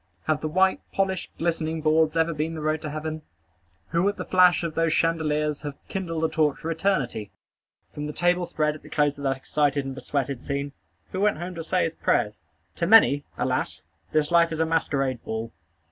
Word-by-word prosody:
Have 155 -1 0
the 155 - -1
white, 185 +4 +3
polished, 190 -2 -1
glistening 165 -1 -1
boards 155 +1 +2
ever 165 +1 +2
been 155 +2 -2
the 155 - -5
road 155 +1 0
to 155 - -4
heaven? 155 +1 -4 0.7
Who 170 +4 +2
at 205 - -4
the - - -4
flash 180 -1 +5
of 165 -2 -2
those 165 0 +1
chandeliers 150 -2 +1
hath 145 -2 -6
kindled 165 -4 -3
a - - +4
torch 155 -3 +1
for 165 - -4
eternity? 140 - -1 0.6
From 150 0 -4
the - - -3
table 175 +2 +1
spread 150 -1 0
at 155 - -11
the - - -14
close 145 -1 +1
of - - -7
that 135 -1 +1
excited 145 0 0
and 135 - -4
besweated 135 -1 -3
scene, 140 0 -3 0.4
who 190 - -2
went 210 -3 +3
home 175 +3 -5
to 165 -1 -6
say 180 +3 +1
his 165 - -1
prayers? 105 -8 0 0.4
To 170 - 0
many, 155 -9 +6
alas! - - -1 0.3
this 155 +1 +1
life 170 -1 +5
is 160 - -3
a 160 - +3
masquerade 135 -6 0
ball. 110 +1 -4
155 Hz, 205 wpm, -25 LUFS, 145-170 Hz, 0.7 s, many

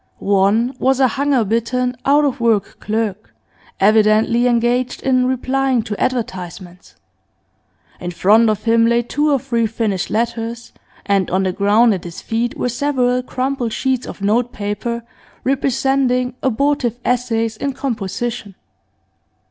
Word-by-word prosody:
One 205 +5 +2
was 265 0 +2
a 260 -2 +4
hunger 280 -2 +1
bitten, 240 +4 -1
out 290 +2 +4
of 270 -4 -1
work 230 -4 +1
clerk, 215 -1 -3 0.4
evidently 215 +3 +4
engaged 245 +1 0
in 255 -1 +2
replying 260 -1 0
to 210 -2 -5
advertisements; 185 -7 -4 1.0
in 175 - -5
front 215 +6 +4
of 215 -1 -1
him 230 0 +3
lay 235 0 +2
two 295 +5 0
or 280 - +4
three 235 -3 -1
finished 215 -4 -2
letters, 230 +1 -3 0.3
and 195 -2 +1
on 190 +2 +1
the 185 - 0
ground 210 +4 +3
at 185 - -4
his 170 -1 -7
feet 230 +1 -2
were - - -1
several 250 -1 0
crumpled 255 -2 -2
sheets 260 -2 -1
of 200 - -8
note 235 +4 +1
paper, 210 +3 -4 0.4
representing 265 -1 +1
abortive 265 -1 0
essays 230 -3 0
in 275 +5 -3
composition. 230 -3 -4
235 Hz, 135 wpm, -18 LUFS, 215-255 Hz, 1.0 s, a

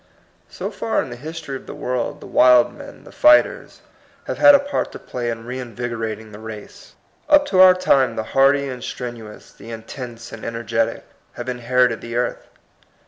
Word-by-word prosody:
So - - -6
far 225 - -1
in 130 - -9
the - - -6
history 155 +1 -7
of 130 - -10
the - - -8
world, 125 -1 -3
the - - -10
wild 125 -1 +5
men, 285 0 -12
the - - -14
fighters, 305 0 +3 0.4
have - - -5
had 290 -1 +8
a - - +5
part 285 +1 -3
to - - -7
play 120 -1 -5
in 115 -1 -5
reinvigorating 115 -3 -5
the 105 - -11
race. 110 -1 -11 0.3
Up 295 -1 +6
to 185 - +2
our 185 -1 +8
time 140 -8 +2
the 110 - -2
hardy 140 +1 +4
and 125 -2 -7
strenuous, 115 -4 -8
the 115 - -13
intense 120 +1 -8
and 115 - -10
energetic, 115 -1 -2 0.3
have - - -8
inherited 125 -1 +1
the 115 0 -7
earth. 120 0 -2
125 Hz, 180 wpm, -21 LUFS, 115-140 Hz, 0.4 s, had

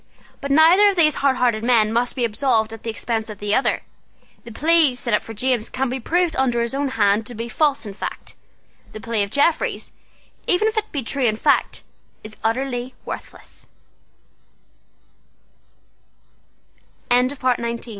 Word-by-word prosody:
But 280 - -4
neither 330 +8 +6
of 400 - -1
these 310 -4 +3
hardhearted 250 -5 +1
men 225 -3 +3
must 240 +1 0
be 245 - 0
absolved 225 -1 0
at 225 - -10
the 230 - -5
expense 225 0 -3
of 210 - -8
the 205 +1 -2
other. 260 - +1 0.6
The 235 - -9
plea 310 +1 +3
set 240 -2 -3
up 210 - +3
for 225 - -10
James 245 0 0
can 265 0 -2
be 260 +2 -3
proved 345 +6 0
under 245 -3 +1
his 235 - -4
own 280 +1 -1
hand 215 -3 +1
to 245 - -6
be 230 +2 -5
false 285 0 0
in 205 - -7
fact. - - -7 0.6
The 215 - -7
plea 225 -1 -2
of 200 - -1
Jeffreys, 285 +7 0 0.6
even 385 +4 +2
if 440 - -2
it 435 -1 -2
be 280 -3 -3
true 265 +3 -1
in 215 - +1
fact, - - +1 0.4
is 215 0 -8
utterl 245 +2 -2
245 Hz, 155 wpm, -21 LUFS, 225-280 Hz, 0.6 s, neither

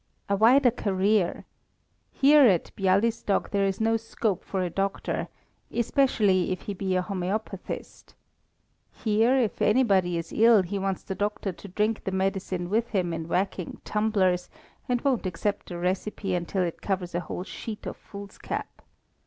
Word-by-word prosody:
"A 200 - +2
wider 245 +5 +5
career. 200 -3 +1 0.7
Here 290 +2 +6
at 185 -6 +1
Bialystok 200 +2 +1
there 200 -1 +2
is 195 0 -2
no 225 +1 +2
scope 220 -3 -2
for 190 -2 -2
a 180 - -1
doctor, 195 +2 -2 0.4
especially 215 -7 +2
if 185 - -3
he 205 - -5
be 190 -1 -2
a 185 - +1
homœopathist. 195 +1 -5 0.8
Here, 225 +3 +2
if 235 -5 0
anybody 195 -7 +3
is 165 0 -5
ill 225 -3 +6
he 195 +3 -3
wants 195 -1 -2
the - - -4
doctor 205 0 -2
to 195 - -12
drink 210 +3 -1
the 190 - -2
medicine 190 -1 -1
with 225 +5 +1
him 180 -6 -1
in 165 0 -4
whacking 185 0 -2
tumblers, 195 -4 +1 0.4
and 245 -1 +1
won't 260 -8 +1
accept 200 +3 -3
a 175 - -5
recipe 185 +2 -2
unless 175 +2 -3
it 180 -3 -1
covers 185 -3 -2
a 175 - 0
whole 175 +1 -5
sheet 210 +2 -7
of - - -4
foolscap. 200 0 -7
195 Hz, 155 wpm, -27 LUFS, 185-220 Hz, 0.8 s, Here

